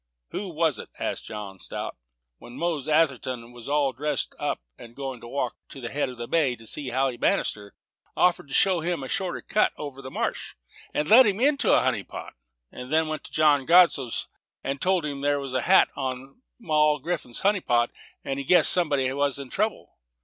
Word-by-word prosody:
"Who 200 -1 -4
was 160 -3 0
it," - - -8
asked - - -3
John 100 -3 -7
Strout, - - -5 0.4
"when 120 - -12
Mose 165 -5 -2
Atherton 130 -6 0
was 120 +1 -10
all 145 -2 +2
dressed 145 +1 -2
up, - - -2 0.4
going 135 -3 -6
to - - -10
walk 130 0 -2 0.2
round 135 -3 -8
the 120 - -5
head 145 -2 -1
of 125 - -10
the 120 0 -6
bay, 145 -7 +2
to 115 - -14
see 140 +3 -4
Sally 130 0 0
Bannister, 105 -3 -1 0.4
offered 180 -4 +2
to 135 - -10
show 190 -3 +4
him 170 -3 -2
a - - -5
shorter 185 +3 -2
cut 215 - +1
over 140 -2 -7
the 130 - -8
marsh, - - -3 0.4
and 150 - -1
led 230 +4 +8
him 200 0 0
into 280 +2 +3
a - - +5
honey - - +1
pot, - - -9 0.4
then 155 +5 -1
went 155 -1 -5
to - - -9
John 145 -3 +3
Godsoe's, 165 -8 +4 0.5
told 185 0 +1
them 140 -2 -4
there 145 0 +1
was 135 -2 -6
a - - +2
man's 130 - -2
hat 190 - +6
on 135 - -5 0.2
Moll 150 -6 +2
Graffam's 150 -5 -3
honey 200 -1 +2
pot, 120 -4 +1 0.3
and 135 0 -3
he - - -3
guessed 180 +5 +7
somebody 145 -7 +2
must 140 0 0
be 140 - -5
in 130 - -14
trouble? 215 +2 -3
140 Hz, 200 wpm, -25 LUFS, 130-170 Hz, 0.5 s, led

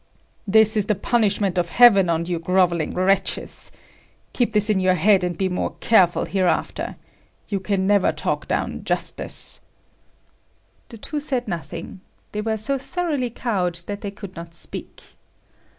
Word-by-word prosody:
"This 220 +2 +4
is 210 -2 +1
the 215 - +2
punishment 200 -3 +1
of 170 -1 -1
heaven 200 -6 +6
on 165 0 0
you 175 -1 -2
grovelling 175 -2 +1
wretches. 190 +2 0 0.6
Keep 240 -3 0
this 210 0 +3
in 210 -3 +2
your 185 0 +3
head 195 0 +4
and 175 -2 -2
be 190 - +1
more 180 -1 -2
careful 185 -6 +4
hereafter. 185 -3 -1 0.5
You 200 - -1
can 190 0 -1
never 200 -1 +3
talk - - -3
down - - -2
justice." - - -3 1.3
The 230 - -10
two 295 +7 -4
said 265 -5 -2
nothing. 170 +1 -6 0.3
They 210 - -3
were 220 0 -1
so 270 +6 0
thoroughly 295 -4 -2
cowed 195 -7 -1
that 205 0 -5
they 205 - -4
could 200 -1 -10
not 170 -1 -9
speak. - - -5
200 Hz, 150 wpm, -22 LUFS, 180-220 Hz, 1.3 s, heaven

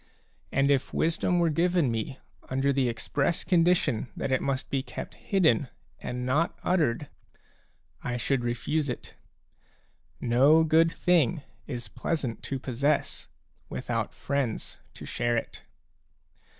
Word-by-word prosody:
And 135 +1 +3
if 135 -2 0
wisdom 170 +2 +1
were 170 -2 +3
given 170 -4 +2
me 115 +4 -3 0.3
under 135 +2 +1
the 130 -2 +2
express 140 +7 -1
condition 165 - +2
that - - -2
it 130 - +2
must 135 -1 -2
be 135 - +1
kept 130 -1 -7
hidden 160 - +2 0.3
and 125 0 -4
not 150 +7 +1
uttered, 150 -7 +1 1.0
I 120 0 -2
should 125 +1 0
refuse 130 +5 -1
it. 125 - -6 1.1
No 140 +7 +5
good 160 +1 +4
thing 170 -4 +2 0.2
is 120 -5 -5
pleasant 130 +2 -3
to 135 - -2
possess, 135 +3 -1 0.4
without - - -3
friends 140 -5 -2 0.2
to - - -9
share 120 0 0
it. - - -5
140 Hz, 125 wpm, -28 LUFS, 125-160 Hz, 1.1 s, No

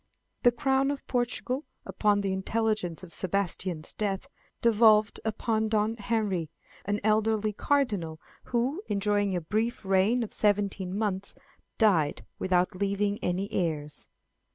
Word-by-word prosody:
The 245 - +6
Crown 270 +2 +1
of 285 -1 -4
Portugal, 250 +2 -1 0.2
upon 205 -1 +2
the 195 -1 -1
intelligence 190 -3 -1
of 170 -3 -11
Sebastian's 185 -3 -1
death, 200 +1 -2 0.3
devolved 215 -2 +4
upon 220 0 0
Don 215 +1 +1
Henry, 205 -7 -1 0.4
an 205 +1 0
elderly 215 0 +2
Cardinal, 205 - 0 0.3
who, 255 +9 0
enjoying 205 -1 +1
a 175 - -1
brief 215 +6 -2
reign 195 +6 +3
of 220 - -7
seventeen 200 -2 +1
months, 200 -2 -2 0.4
died 180 -10 +2
without 180 -1 +2
leaving 200 +2 0
any 180 +3 -1
heirs. 150 -4 -2
205 Hz, 125 wpm, -28 LUFS, 190-225 Hz, 0.4 s, The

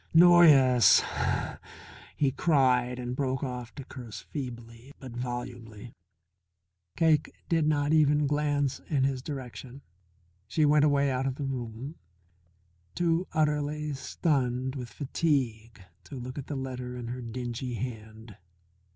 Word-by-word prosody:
"Noyes 150 - +7 0.5
" - - -18
he 140 -2 +2
cried 125 -4 +2
and 125 0 -4
broke 130 -1 -1
off 125 -3 -5
to 140 - -7
curse 125 -4 -9
feebly 120 -2 -8
but 130 -3 -9
volubly. 120 -2 -6 1.0
Cake 160 -3 +3 0.2
did 165 -2 +2
not 145 0 +1
even 150 -1 +4
glance 145 -1 0
in 140 -4 +1
his 135 -1 0
direction. 135 -1 -8 0.6
She 150 +8 +2
went 150 0 +4
away 140 -1 +2
out 130 +1 -1
of 130 - -2
the 140 - -4
room, 130 +2 -5 1.0
too 170 +1 +1
utterly 150 -1 0
stunned 130 -2 -1
with 125 -3 -6
fatigue 125 - -1 0.3
to - - -9
look 130 +2 -6
at 135 - -8
the 145 - -4
letter 125 -2 -5
in 120 -1 -6
her 125 +1 -5
dingy 120 +1 -5
hand. 110 -2 -7
130 Hz, 130 wpm, -28 LUFS, 125-145 Hz, 1.0 s, Noyes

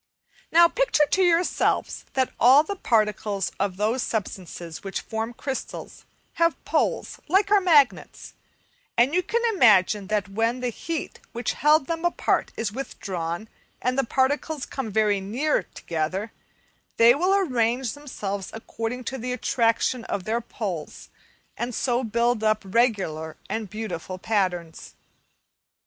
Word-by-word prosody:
Now 340 +1 +7
picture 405 -7 +2
to 380 - +1
yourselves 350 -1 +1
that 260 -1 0
all 265 +5 +7
the 400 +6 -4
particles 210 - 0
of 195 -2 -1
those 220 +5 0
substances 180 -7 -5
which 195 -1 -4
form 225 +1 -4
crystals 265 +2 -6 0.4
have 335 -1 +2
poles - - -1
like 390 +5 +2
our 410 -1 +6
magnets, 300 -8 +2 0.6
then 245 +5 +4
you 360 - +3
can 470 +5 -1
imagine 210 - +4
that 210 -1 0
when 225 +5 0
the 250 -1 -1
heat 325 +7 -5
which 235 -1 -2
held 300 -1 +4
them 330 +2 -3
apart 345 - +1
is 225 -2 -2
withdrawn 185 -7 -5 0.3
and 250 +1 0
the 270 - +2
particles 275 +4 0
come 265 -5 -5
very 210 -1 +2
near 250 +11 0
together, 175 +7 -4 0.7
they 230 +1 +7
will 365 +8 +2
arrange 250 - +1
themselves 205 -9 -5
according 225 +2 -5
to 265 +2 -4
the 250 +2 -3
attraction 235 0 +1
of 195 - -3
their 225 +4 -1
poles 190 -9 -6 0.5
and 240 0 -4
so 245 0 0
build 235 0 +1
up 215 0 +2
regular 190 -8 0
and 220 -3 -3
beautiful 200 -4 -5
patterns. 180 -5 -2
230 Hz, 135 wpm, -25 LUFS, 205-275 Hz, 0.7 s, Now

